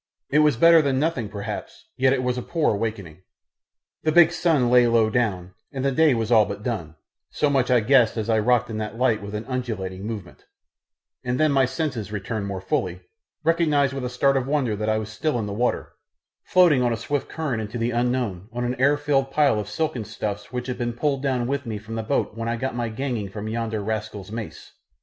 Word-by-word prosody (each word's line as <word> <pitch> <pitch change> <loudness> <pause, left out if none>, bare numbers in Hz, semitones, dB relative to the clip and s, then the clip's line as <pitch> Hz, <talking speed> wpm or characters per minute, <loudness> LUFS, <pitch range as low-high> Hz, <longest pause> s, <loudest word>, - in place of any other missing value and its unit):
It 150 - +4
was 150 -5 +4
better 165 +4 +7
than 140 -3 0
nothing 150 -8 -1
perhaps, 100 +1 -7
yet 130 0 +3
it 130 -1 +1
was 125 0 0
a 125 - -3
poor 160 -2 0
awakening. 100 -6 -4 0.8
The 155 - +1
big 170 0 +6
sun 160 -8 +2
lay 125 -1 +6
low 115 -2 +3
down, 95 -6 -1 0.2
and 135 -2 -3
the 140 - +2
day 155 -1 +4
was 115 0 -2
all 110 -2 +7
but 100 0 -6
done; 90 -11 -4 0.3
so 150 -1 0
much 130 -3 +1
I 125 -2 +4
guessed 120 -1 +4
as 110 - -2
I 110 -1 +2
rocked 120 +1 +2
in 110 - -3
that 110 +1 -5
light 120 -4 +2
with 100 +1 -6
an 105 +1 -4
undulating 105 -7 -4
movement, 105 -6 -8 0.8
and 125 0 -1
then 155 -1 +3
as - - +1
my 135 -1 +4
senses 130 -5 -3
returned 105 0 -3
more 95 -2 -4
fully, 90 -1 -2 0.4
recognised 150 -4 +2
with 135 -1 -4
a 125 - -2
start 135 +2 +2
of 130 -1 -1
wonder 135 -7 0
that 105 +1 -2
I 110 - +2
was 110 0 -4
still 145 +5 -1
in 110 - -2
the 100 - -4
water, 120 +4 -1 0.5
floating 175 -8 +5
on 120 -1 +2
a 115 - -1
swift 140 +5 -3
current 140 -9 -2
into 110 +2 -5
the 115 +1 -1
unknown 120 -5 -1
on 120 +1 -3
an 120 +1 -1
air 140 +2 +4
filled 140 -2 +1
pile 140 -5 +3
of 105 -1 -5
silken 125 0 -2
stuffs 105 -1 -5
which 125 -1 -4
had 125 - -4
been 120 -1 -1
pulled 135 +2 -1
down 130 -3 0
with 140 0 -2
me 110 -2 -3
from 110 +2 -9
the 115 - -2
boat 110 -1 -1
when 115 0 -3
I 115 - 0
got 130 +3 -3
my 120 -1 -2
ganging 115 -3 -3
from 105 +2 -6
yonder 110 -1 -2
rascal's 105 -2 -4
mace. 110 -8 -7
120 Hz, 230 wpm, -24 LUFS, 110-135 Hz, 0.8 s, better